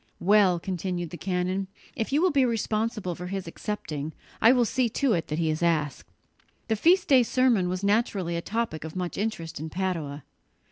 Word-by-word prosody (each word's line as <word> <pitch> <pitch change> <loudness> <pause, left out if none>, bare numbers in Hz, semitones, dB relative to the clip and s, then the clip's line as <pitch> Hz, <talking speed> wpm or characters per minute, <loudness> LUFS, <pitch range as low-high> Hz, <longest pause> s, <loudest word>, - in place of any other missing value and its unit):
"Well," 195 -2 +4
continued 175 -2 -3
the 175 - -6
canon, 185 +1 -1 0.3
"if 225 - -3
you 295 +5 +2
will 370 - +4
be 280 -2 +3
responsible 220 -4 -1
for 180 +2 -7
his 195 0 -4
accepting, 160 -5 -5 0.3
I 225 - +8
will 250 -2 +4
see 255 +1 +1
to 265 +1 +1
it 165 - -1
that 150 - -3
he 160 -1 +1
is 155 - -3
asked." 155 -4 0 0.6
The 220 - +3
feast 350 - +4
day 265 -3 +6
sermon 235 -6 +2
was 185 +2 -3
naturally 200 -4 +1
a 170 - -2
topic 220 -6 -3
of 160 -1 -7
much 180 -1 -3
interest 180 -8 -3
in 160 +1 -5
Padua. 160 -6 -3
190 Hz, 190 wpm, -27 LUFS, 170-225 Hz, 0.6 s, I